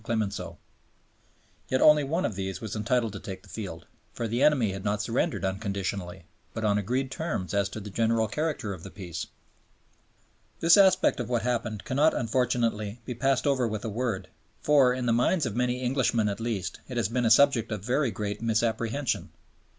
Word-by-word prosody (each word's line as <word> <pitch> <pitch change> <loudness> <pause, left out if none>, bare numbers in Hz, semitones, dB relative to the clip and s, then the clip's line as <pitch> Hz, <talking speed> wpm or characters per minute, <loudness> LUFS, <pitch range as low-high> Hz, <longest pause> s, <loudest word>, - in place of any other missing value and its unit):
Clemenceau. 110 -3 -3 1.1
Yet 130 - +2
only 150 +1 +6
one 160 +6 -1
of 110 - -1
these 95 0 -4
was 110 -2 -5
entitled 115 0 0
to 100 - -6
take 95 -1 -8
the - - -18
field; 90 -7 -7 0.3
for 115 - -3
the 120 +4 -1
enemy 140 -8 +4
had 95 0 -6
not 105 0 0
surrendered 120 - -1
unconditionally, 95 -2 -3 0.3
but 110 - -3
on 105 -1 +3
agreed 130 +6 -1
terms 135 - -3
as 100 -1 +1
to 110 - -6
the 105 -1 -8
general 115 +1 +1
character 150 -4 -2
of 90 - -9
the - - -9
Peace. 90 -2 -6 1.3
This 165 +1 +6
aspect 190 -7 +4
of 120 -2 -3
what 120 -2 0
happened 115 -3 -2
cannot, 145 +4 +2
unfortunately, 115 -2 0
be 125 - -4
passed 135 +2 +1
over 135 -4 +2
with 110 -1 -4
a - - -2
word, 110 -3 -2 0.3
for 140 -4 +4
in 125 0 -2
the 115 - +2
minds 130 +8 +2
of 110 -3 -3
many 125 +1 0
Englishmen 120 -4 +1
at 100 - -4
least 115 -5 -3
it 125 - -5
has 115 -5 +1
been 120 +1 0
a - - +4
subject 115 -2 +4
of 105 -2 -4
very 130 +2 +1
great 105 0 -4
misapprehension. 115 +3 0
115 Hz, 190 wpm, -27 LUFS, 105-130 Hz, 1.3 s, only